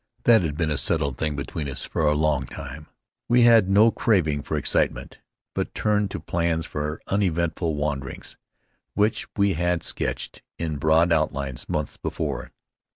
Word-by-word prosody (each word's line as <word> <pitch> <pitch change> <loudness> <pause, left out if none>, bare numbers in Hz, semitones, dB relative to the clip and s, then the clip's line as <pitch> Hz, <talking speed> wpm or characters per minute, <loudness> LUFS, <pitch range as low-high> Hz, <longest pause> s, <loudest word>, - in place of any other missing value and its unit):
That 115 -3 +6
had 75 -4 -3
been 80 -2 0
a 75 - +1
settled 70 -3 0
thing 75 -2 -1
between 70 +1 -4
us 65 0 -4
for - - -3
a 75 - +3
long 75 0 +1
time. 70 +3 -8 0.4
We 120 0 +5
had 115 -5 +6
no 105 +4 +6
craving 80 -13 +1
for - - -3
excitement, - - 0 0.3
but - - -3
turned 105 -1 +1
to - - -5
plans 85 -1 -1
for 75 +1 -4
uneventful 85 -4 0
wanderings 70 -3 -4 0.6
which 105 +1 +1
we 100 -1 +3
had 85 0 0
sketched - - -2 0.2
in 80 -3 -3
broad 80 +3 +3
outlines 70 -5 -2
months - - -2
before. - - -4
80 Hz, 160 wpm, -24 LUFS, 75-95 Hz, 0.6 s, That